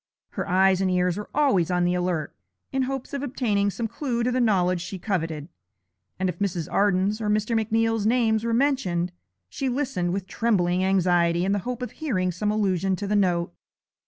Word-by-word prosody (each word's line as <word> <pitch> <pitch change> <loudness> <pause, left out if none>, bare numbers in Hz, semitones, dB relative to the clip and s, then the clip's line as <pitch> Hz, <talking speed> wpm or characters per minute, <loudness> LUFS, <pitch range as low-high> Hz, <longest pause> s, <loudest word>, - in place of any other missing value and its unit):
Her - - -5
eyes 190 +1 +4
and 190 - +1
ears 180 -1 +1
were 210 +1 -6
always 265 - +2
on 180 -1 +1
the 175 - +2
alert, 175 -4 -2 0.4
in 270 - 0
hopes 270 0 -3
of 280 - -2
obtaining 225 -7 0
some 225 +3 -3
clue 240 -1 -2
to 250 - +1
the 255 +1 +1
knowledge 185 -6 +2
she 190 +2 -6
coveted, 165 -6 -3 0.7
and 185 - 0
if 180 - -4
Mrs. 180 -5 -1
Arden's 200 +2 +2
or 210 - -1
Mr. 215 +2 +1
McNeal's 225 0 +1
names 225 -2 +2
were 230 - -1
mentioned 230 -10 +1 0.4
she 270 - -3
listened 250 -10 -1
with 190 0 -2
trembling 185 -4 +1
anxiety 175 -2 +2
in 195 - +1
the 205 - +1
hope 250 0 -4
of 250 - -5
hearing 195 - -1
some 205 +4 -2
allusion 195 -3 +1
to 205 - -5
the 210 +1 0
note. 175 - +1
200 Hz, 190 wpm, -25 LUFS, 180-230 Hz, 0.7 s, eyes